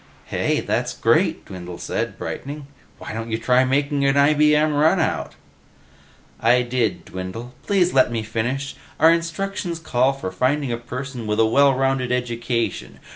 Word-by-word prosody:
"Hey, - - 0
that's - - -2
great!" - - +2
Dwindle 90 -2 -8
said, - - -3
brightening. 145 +1 -6 0.3
"Why - - -8
don't 115 +1 -5
you 110 - 0
try 125 +3 +3
making 140 +2 0
an 135 0 +3
IBM 150 +1 +4
runout?" 160 +4 +1 1.1
"I 125 +2 +4
did, 115 -9 -1
Dwindle. 95 +7 -7
Please 185 -3 +1
let 130 -2 +4
me 115 -2 -2
finish? 120 +5 -3 0.2
Our 160 - +7
instructions 170 +1 -3
call 135 -4 +1
for 135 -9 -5
finding 140 0 0
a 115 - -1
person 125 0 -6
with 105 +1 0
a 110 - +5
well 140 +4 +4
rounded 135 -1 0
education. 120 -1 -2
130 Hz, 150 wpm, -22 LUFS, 115-145 Hz, 1.1 s, Our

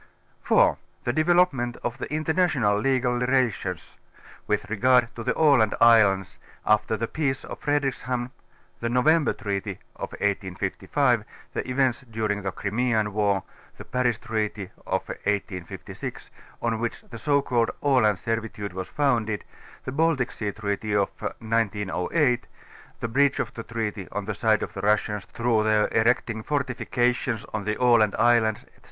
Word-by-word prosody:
4) - - +3 0.2
The 120 - 0
Developement 155 -7 +2
of 120 0 -3
the - - -5
International 155 - +2
Legal 125 0 +1
Rela 125 -1 +3
tions 90 -3 -7 0.5
with 105 - 0
regard 120 +2 +3
to 115 - -6
the - - 0
Aland 140 -9 +4
islands 105 -5 +4 0.3
after 105 +1 +2
the 115 +2 -2
peace 135 -2 -2
of - - -8
Fredrikshamn 130 -4 -1 0.5
(the 115 - -2
November 150 +6 +3
treaty 100 -3 -4 0.2
of - - -6
1855, 100 +5 0 0.3
the - - -3
events 125 -1 +1
during 110 -2 -1
the 95 -1 -2
Crimean 110 0 0
War, 100 -2 +1 0.3
the - - -9
Paris 125 -1 0
treaty 110 -4 -3 0.2
of - - -1
1856, 100 -3 -5 0.3
on 115 -2 0
which 120 0 -3
the 115 - -7
so 140 +1 +2
called 120 -4 +1
Aland 125 -8 +3
Serviture 115 -2 -3
was 95 0 -5
founded, 115 -7 0 0.4
the 130 - -3
Bal 160 +4 +2
tic 125 -2 -2
Sea 105 -2 -3
treaty 105 0 -2
of 100 -1 +2
1908, 115 - 0 0.5
the - - -1
breach 135 +4 +2
of - - -2
the 115 - -6
treaty 110 -4 -4
on 105 -1 -3
the 105 - -2
side 110 +1 +2
of - - -6
the - - -5
Russians 105 -1 +1
through 115 -2 0
their 110 -1 +3
erecting 115 -1 +1
fortifications 125 -4 -1
on 110 -2 -3
the 105 0 0
Aland 120 -4 +4
islands, 115 -2 +3
etc.) - - -26
115 Hz, 150 wpm, -25 LUFS, 105-125 Hz, 0.5 s, Aland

